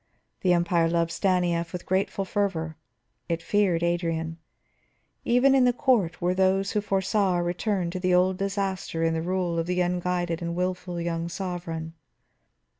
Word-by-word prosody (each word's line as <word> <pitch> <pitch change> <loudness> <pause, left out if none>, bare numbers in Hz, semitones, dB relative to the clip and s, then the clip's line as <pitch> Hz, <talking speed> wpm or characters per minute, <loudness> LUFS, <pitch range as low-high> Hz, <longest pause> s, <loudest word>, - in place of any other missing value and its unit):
The 180 -2 +3
Empire 170 -1 +2
loved 170 0 +1
Stanief 175 -3 +1
with 180 - -6
grateful 190 +1 0
fervor, 180 -5 -1 0.5
it 165 0 -1
feared 190 -5 +2
Adrian. 165 -1 -1 0.9
Even 250 +3 +4
in 265 -1 +5
the 245 0 +4
court 220 -10 +1
were 175 +1 +1
those 190 +1 +2
who 210 - 0
foresaw 195 -1 +1
a 175 - 0
return 180 0 -1
to 185 0 -1
old 180 +1 +3
disaster 195 -4 -2
in 165 0 +2
the 160 - -1
rule 175 -1 -1
of 165 - -2
the 180 0 0
unguided 175 -1 -1
and 170 0 -3
wilful 180 -1 -2
young 170 0 -2
sovereign. 170 -3 -5
180 Hz, 155 wpm, -26 LUFS, 170-190 Hz, 0.9 s, in